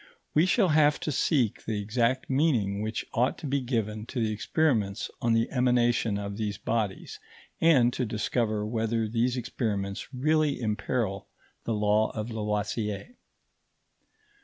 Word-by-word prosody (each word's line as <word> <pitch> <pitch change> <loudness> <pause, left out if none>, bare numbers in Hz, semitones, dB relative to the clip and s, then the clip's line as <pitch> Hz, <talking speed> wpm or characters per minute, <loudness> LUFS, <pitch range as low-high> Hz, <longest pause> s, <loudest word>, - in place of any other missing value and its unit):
We 160 +4 +4
shall 195 -2 +3
have 150 -1 +4
to 155 - -2
seek 130 -5 +1
the 110 -2 -2
exact 115 +5 0
meaning 125 -9 +1
which 110 +1 -3
ought 125 +3 +1
to 165 - -8
be 140 0 0
given 110 -3 -2
to 125 - -4
the 110 -2 +1
experiments 110 -4 0
on 115 -1 +2
the 115 0 +2
emanation 120 -4 +2
of 100 0 -5
these 105 -2 -2
bodies, 110 -4 -3 0.4
and 130 -7 +5
to - - -1
discover 110 0 -1
whether 115 0 -1
these 120 +3 0
experiments 105 -5 -3
really 150 +2 +1
imperil 105 -2 -2 0.4
the 115 - 0
law 105 +1 +2
of 110 +1 -4
Lavoisier. 105 - -2
115 Hz, 140 wpm, -28 LUFS, 105-130 Hz, 0.4 s, and